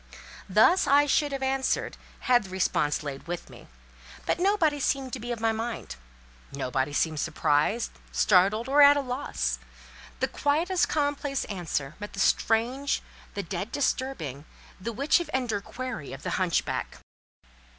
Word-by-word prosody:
Thus 370 Hz, -, +5 dB
I 285 Hz, +1 st, +5 dB
should 290 Hz, +1 st, +2 dB
have 270 Hz, -1 st, -3 dB
answered, 265 Hz, 0 st, 0 dB, 0.3 s
had 245 Hz, -3 st, +3 dB
the -, -, -10 dB
response 165 Hz, -6 st, 0 dB
lain 140 Hz, -2 st, -5 dB
with 175 Hz, 0 st, -5 dB
me, -, -, -14 dB, 0.6 s
but -, -, 0 dB
nobody 350 Hz, -6 st, +2 dB
seemed 270 Hz, -2 st, -1 dB
to 260 Hz, -, -3 dB
be 240 Hz, +2 st, -5 dB
of 235 Hz, -, -3 dB
my 225 Hz, 0 st, +2 dB
mind; 225 Hz, -, -4 dB, 0.6 s
nobody 135 Hz, 0 st, -2 dB
seemed 155 Hz, +1 st, 0 dB
surprised, 150 Hz, +15 st, +1 dB, 0.2 s
startled, 205 Hz, +4 st, +3 dB
or 285 Hz, +2 st, +5 dB
at 285 Hz, 0 st, +8 dB
a -, -, +1 dB
loss. 155 Hz, -, -2 dB, 0.6 s
The -, -, +1 dB
quietest 335 Hz, +6 st, +1 dB
commonplace 285 Hz, -2 st, -1 dB
answer 165 Hz, -8 st, -3 dB
met 205 Hz, 0 st, -7 dB
the 195 Hz, -, -7 dB
strange, 240 Hz, +8 st, +1 dB, 0.3 s
the 200 Hz, -, -2 dB
dead 190 Hz, +5 st, -4 dB
disturbing, 250 Hz, -, -2 dB, 0.3 s
the 230 Hz, +5 st, -4 dB
Witch 275 Hz, +9 st, +2 dB
of 345 Hz, -, -5 dB
Endor 235 Hz, -6 st, -1 dB
query 235 Hz, -, -6 dB
of 135 Hz, -, -9 dB
the -, -, -3 dB
hunchback. 180 Hz, -3 st, -1 dB
235 Hz, 150 wpm, -27 LUFS, 175-275 Hz, 0.6 s, at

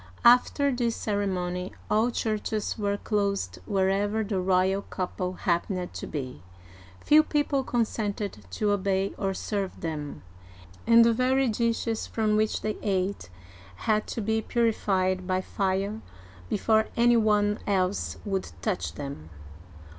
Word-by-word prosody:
After 250 Hz, +4 st, +5 dB
this 240 Hz, -2 st, 0 dB
ceremony, 185 Hz, -3 st, -2 dB
all 220 Hz, +3 st, +2 dB
churches 215 Hz, -2 st, -2 dB
were 205 Hz, -1 st, -1 dB
closed 200 Hz, -, -1 dB
wherever 200 Hz, +3 st, +1 dB
the 200 Hz, -2 st, -1 dB
royal 190 Hz, +1 st, +2 dB
couple 185 Hz, -1 st, -4 dB
happened 180 Hz, 0 st, -1 dB
to -, -, -6 dB
be, 130 Hz, -4 st, -5 dB, 0.6 s
few 305 Hz, +1 st, +6 dB
people 290 Hz, -3 st, 0 dB
consented 215 Hz, -, -2 dB
to 205 Hz, -, 0 dB
obey 195 Hz, -1 st, 0 dB
or 195 Hz, -1 st, -1 dB
serve 200 Hz, -2 st, -3 dB
them, 150 Hz, -, -5 dB, 0.6 s
and 230 Hz, 0 st, +7 dB
the 230 Hz, -, +4 dB
very 260 Hz, +3 st, +2 dB
dishes 230 Hz, 0 st, -1 dB
from 215 Hz, -1 st, +1 dB
which 215 Hz, 0 st, +1 dB
they 215 Hz, 0 st, -2 dB
ate 190 Hz, -, -1 dB, 0.6 s
had 215 Hz, -1 st, +2 dB
to 230 Hz, -, -3 dB
be 220 Hz, +1 st, 0 dB
purified 190 Hz, -6 st, 0 dB
by 185 Hz, -1 st, +1 dB
fire 195 Hz, +2 st, -1 dB, 0.5 s
be -, -, 0 dB
fore 220 Hz, +1 st, +3 dB
any 240 Hz, 0 st, +5 dB
one 210 Hz, -1 st, +2 dB
else 190 Hz, -1 st, 0 dB
would 195 Hz, -2 st, -2 dB
touch 210 Hz, -5 st, -1 dB
them. 140 Hz, -, -7 dB
205 Hz, 130 wpm, -27 LUFS, 185-220 Hz, 0.6 s, and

